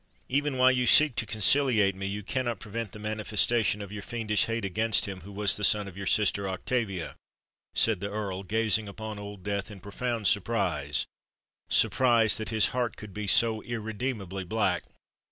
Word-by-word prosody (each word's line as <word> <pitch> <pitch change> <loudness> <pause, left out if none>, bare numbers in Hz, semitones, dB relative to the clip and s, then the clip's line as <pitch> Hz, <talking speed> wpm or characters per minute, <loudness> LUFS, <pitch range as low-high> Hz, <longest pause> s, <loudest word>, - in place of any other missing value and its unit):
"Even 145 0 0
while 130 0 +6
you 125 -1 0
seek 150 +1 +6
to 115 - -1
conciliate 110 -2 +3
me, 95 +1 -5
you 105 +1 -4
cannot 120 -1 -2
prevent 110 0 -5
the - - -10
manifestation 110 0 0
of 100 - -10
your 105 -1 -6
fiendish 110 -1 -1
hate 115 -2 -3
against 110 +3 +2
him 95 -2 -7
who 100 - -11
was 100 0 +3
the 105 - -5
son 105 0 +4
of 95 - -10
your 100 -1 -6
sister 100 -1 +1
Octavia!" 95 -2 -3 0.6
said 110 -4 +3
the 100 +2 -4
Earl, 100 -2 -4
gazing 110 +1 +1
upon 110 +1 -7
Old 100 -2 -9
Death 100 +1 -3
in 105 -2 -10
profound 115 +3 -4
surprise,—surprise 105 - 0
that 110 -1 -4
his 110 -2 +2
heart 125 -2 -2
could 105 -2 -10
be 105 +1 -5
so 110 +2 +3
irredeemably 110 -4 -4
black. 110 +4 -1
105 Hz, 170 wpm, -28 LUFS, 100-115 Hz, 0.6 s, while